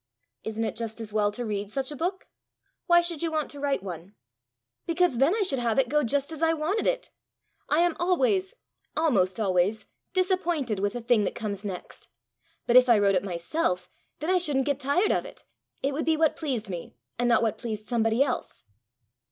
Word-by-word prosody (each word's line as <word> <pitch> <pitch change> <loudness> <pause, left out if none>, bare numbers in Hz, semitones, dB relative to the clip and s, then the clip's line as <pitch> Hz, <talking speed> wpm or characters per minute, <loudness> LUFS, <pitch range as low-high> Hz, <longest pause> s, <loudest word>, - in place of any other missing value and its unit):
"Isn't 220 +1 -3
it 220 - -2
just 225 0 -5
as 215 -2 -6
well 210 -1 +2
to 240 +4 -4
read 205 -2 -3
such 265 +5 -3
a - - -5
book? 365 +6 -2 0.6
Why 345 -1 +6
should 340 -3 -4
you 330 -1 -1
want 310 -2 -1
to 285 - -9
write 280 -6 0
one?" 180 +1 -8 0.7
"Because 335 -7 +2
then 290 +9 +4
I 440 - +1
should 275 -9 -1
have 235 -2 0
it 265 -3 +3
go 300 +2 +3
just 280 +5 0
as 320 -1 -7
I 325 0 +4
wanted 325 +7 -1
it! - - -1 0.6
I 305 +3 +4
am 345 -1 +2
always 380 +3 +1 0.4
almost 230 - +2
always 195 +1 +1 0.3
disappointed 345 - 0
with 200 +1 0
the 245 - -4
thing 230 -2 +3
that - - -3
comes 205 -3 -4
next. 190 -3 -7 0.6
But 240 - +5
if 255 0 +6
I 235 - +7
wrote 200 -1 +3
it 185 - +1
myself, 180 - -2 0.3
then 315 +4 -1
I 370 - +4
shouldn't 285 -6 0
get 285 -2 0
tired 290 +10 +2
of - - +1
it; - - -11 0.4
it 275 +1 +1
would 305 - -2
be 320 0 +2
what 315 -1 +3
pleased 255 -9 -3
me, 175 -8 -7 0.2
and 245 0 +2
not 235 -1 +4
what 220 -1 0
pleased 215 -2 -5
somebody 225 +1 +2
else." 265 -3 -4
260 Hz, 205 wpm, -27 LUFS, 215-325 Hz, 0.7 s, I